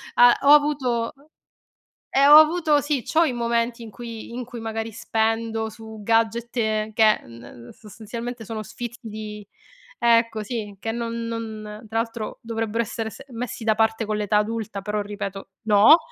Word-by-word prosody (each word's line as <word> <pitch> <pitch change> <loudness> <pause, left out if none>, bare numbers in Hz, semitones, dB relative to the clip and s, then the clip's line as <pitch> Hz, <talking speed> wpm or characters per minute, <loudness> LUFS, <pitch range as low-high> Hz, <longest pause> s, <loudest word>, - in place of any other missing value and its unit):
a 245 0 +8
ho 280 - +6
avuto, 295 -3 +3 0.3
oh 285 +3 -25 0.8
e 275 +1 +4
ho 295 +1 +11
avuto 310 -2 +5
sì, 290 -3 -1
c'ho 325 +8 +3
i 295 -6 0
momenti 235 0 -1
in 225 - -10
cui 230 0 -8
in 250 +1 -4
cui 240 0 -9
magari 225 0 -4
spendo 225 0 -1
su 220 0 -11
gadget 230 +2 0
e 215 -1 0
che, 225 - +4 0.2
ehm 115 0 -13
ehm, 120 0 -12
sostanzialmente 225 +3 -8
sono 220 0 -5
sfizi 235 +2 -7
di 210 -2 -7 0.5
ecco 230 -2 +3
sì, 210 -2 -5
che 225 - -3
non 230 0 -3
non 220 -2 -6
tra 225 +1 -1
l'altro 230 -1 -4
dovrebbero 225 0 -2
essere 225 0 -4
se 270 - -12
messi 235 -1 -5
da 220 -1 +2
parte 225 0 +1
con 210 0 -2
l'età 210 0 +1
adulta, 215 -1 -2
però 210 +1 -2
ripeto, 200 -1 -6 0.2
no! 215 +8 +7
225 Hz, 170 wpm, -23 LUFS, 215-235 Hz, 0.8 s, ho